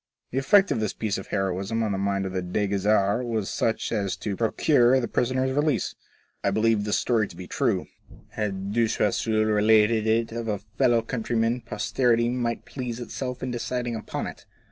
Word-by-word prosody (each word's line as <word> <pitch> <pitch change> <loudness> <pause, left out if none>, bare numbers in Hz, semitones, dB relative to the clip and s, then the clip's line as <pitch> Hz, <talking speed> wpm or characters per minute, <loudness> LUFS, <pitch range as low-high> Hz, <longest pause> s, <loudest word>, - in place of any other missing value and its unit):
The 130 - 0
effect 190 +9 +4
of - - +1
this 110 -2 -1
piece 105 -3 -2
of 95 - -9
heroism 95 +3 -1
on 110 - 0
the 95 - -1
mind 100 0 0
of 95 - -4
the 95 - -1
Dey 90 +4 -1
Ghezzar 100 +3 +2
was 110 -4 -2
such 115 - -1
as 100 -4 -1
to 100 -2 -4
procure 125 +3 +3
the 120 - -2
prisoner's 130 +3 0
release. 145 +1 0 0.5
I - - +3
believe 110 +1 +2
this 105 - +1
story 110 -4 +1
to - - -13
be 90 - -8
true. - - 0 0.4
Had 100 -2 -3
De 115 0 +3
Choiseul 110 +1 +1
related 110 +1 +3
it 115 +1 +1
of 115 0 -4
a 105 -2 0
fellow 115 +3 +1
countryman 115 0 -1
posterity 120 +2 +1
might 120 -2 -2
please 125 -3 -5
itself 125 +1 -5
in 130 - -2
deciding 120 0 -2
upon 110 - -4
it. - - -9
110 Hz, 190 wpm, -25 LUFS, 105-120 Hz, 0.5 s, effect